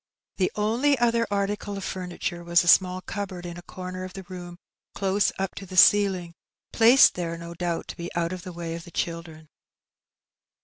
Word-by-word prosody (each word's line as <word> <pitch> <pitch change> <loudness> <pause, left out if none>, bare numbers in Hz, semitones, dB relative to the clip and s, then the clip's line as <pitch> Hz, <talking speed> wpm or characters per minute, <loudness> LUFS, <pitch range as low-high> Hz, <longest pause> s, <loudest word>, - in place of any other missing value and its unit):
The 185 - +1
only 235 +7 +2
other 235 -1 +2
article 200 0 -2
of 195 - -6
furniture 180 -2 -4
was 170 0 +3
a - - -6
small 185 +1 +5
cupboard 185 -2 -6
in 175 -1 -6
a 175 - -9
comer 185 +1 -7
of 185 0 -8
the 195 - -8
room 175 -1 -9 0.4
close 195 +1 +1
up 190 -1 -2
to 195 - -7
the 185 0 -8
ceiling, 185 -3 +5 0.4
placed 240 +4 +7
there, 170 -2 -4
no 170 0 -8
doubt, 170 -1 -3
to - - -7
be 170 0 -6
out 170 +1 -1
of 185 - -6
the 180 - -8
way 170 -1 -5
of 165 0 -6
the 170 - -12
children. 165 -2 -5
185 Hz, 190 wpm, -25 LUFS, 170-200 Hz, 0.4 s, placed